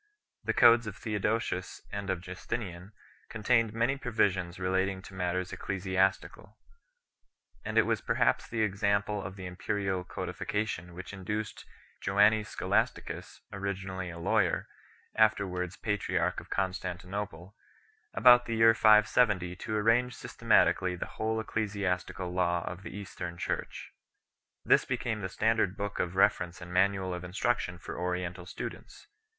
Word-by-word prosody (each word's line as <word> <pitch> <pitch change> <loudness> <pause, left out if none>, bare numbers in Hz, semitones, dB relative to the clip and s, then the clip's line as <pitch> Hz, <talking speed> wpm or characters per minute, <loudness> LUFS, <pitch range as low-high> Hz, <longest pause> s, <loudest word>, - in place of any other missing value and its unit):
The - - +1
codes 120 -1 +6
of 110 - -6
Theodosius 105 -4 -2
and 100 -1 -4
of 95 -3 -1
Justinian 95 0 -6 0.4
contained 115 0 +2
many 120 +5 +1
provisions 100 -8 0
relating 95 +1 0
to 100 - -12
matters 90 0 -2
ecclesiastical, 95 0 -1 1.1
and - - -3
it - - +6
was - - 0
perhaps - - +1
the 110 -1 0
example 100 0 0
of 95 0 -7
the 95 -2 -8
imperial 95 +1 -2
codification 90 -2 -4
which 95 +3 -8
induced 105 +3 -4 0.4
Joannes 105 +2 +4
Scho - - -6
lasticus, - - -1
originally 95 -2 -4
a 85 - -8
lawyer, 95 +1 +1 0.5
afterwards 95 -5 +1
patriarch 95 -5 -1
of 90 - -14
Con 95 -1 0
stantinople, 95 0 -6 0.6
about 125 -1 +7
the 115 - -1
year 115 0 +6
570 105 -4 +4
to 110 +4 -4
arrange 115 +3 +2
systematically 90 -1 +2
the 85 - -4 0.2
whole 110 0 0
ecclesiastical 100 -4 -2
law 85 -2 +1
of 95 +1 -5
the - - -7
Eastern 90 -4 -7
Church - - -4 0.7
1. - - -16
This - - +7
became 110 -3 -2
the 95 - -3
standard 110 0 +1
book 100 0 -4
of 90 +1 -1
reference 95 -3 +2
and 85 0 -9
manual 95 0 +2
of 90 0 -5
instruction 90 0 -1
for 90 - -7
Oriental 90 0 -3
students. - - -8
95 Hz, 135 wpm, -30 LUFS, 90-110 Hz, 1.1 s, about